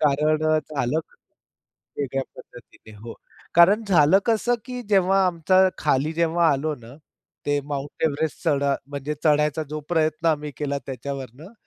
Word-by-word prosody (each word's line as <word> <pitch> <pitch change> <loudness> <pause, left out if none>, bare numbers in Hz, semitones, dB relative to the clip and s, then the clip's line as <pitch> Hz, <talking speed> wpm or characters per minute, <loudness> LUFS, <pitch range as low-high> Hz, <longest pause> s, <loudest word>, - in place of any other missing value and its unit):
कारण 150 +2 +2
अ, 155 0 +3
झालं 145 0 -1 1.0
वेगळ्या 135 -1 -2
पद्धतीने. 110 -2 -15
हो 115 +2 -9 0.4
कारण 195 +6 +5
झालं 165 +1 +5
कसं 235 +1 +2
की 250 -1 -6
जेव्हा 195 -1 +4
आमचा 185 +2 +3
खाली 150 +1 +1
जेव्हा 170 0 +2
आलो 150 +3 -1
ना, 120 +2 -14 0.5
ते 145 0 +1
माउंट 145 0 -6
एव्हरेस्ट 155 0 -1
चढा 140 -1 +2
म्हणजे 145 +1 -5
चढायचा 150 0 +2
जो 155 0 -4
प्रयत्न 160 -1 0
आम्ही 150 -1 -1
केला 140 -1 -2
त्याच्यावरनं, 135 - -7
150 Hz, 140 wpm, -23 LUFS, 140-170 Hz, 1.0 s, कारण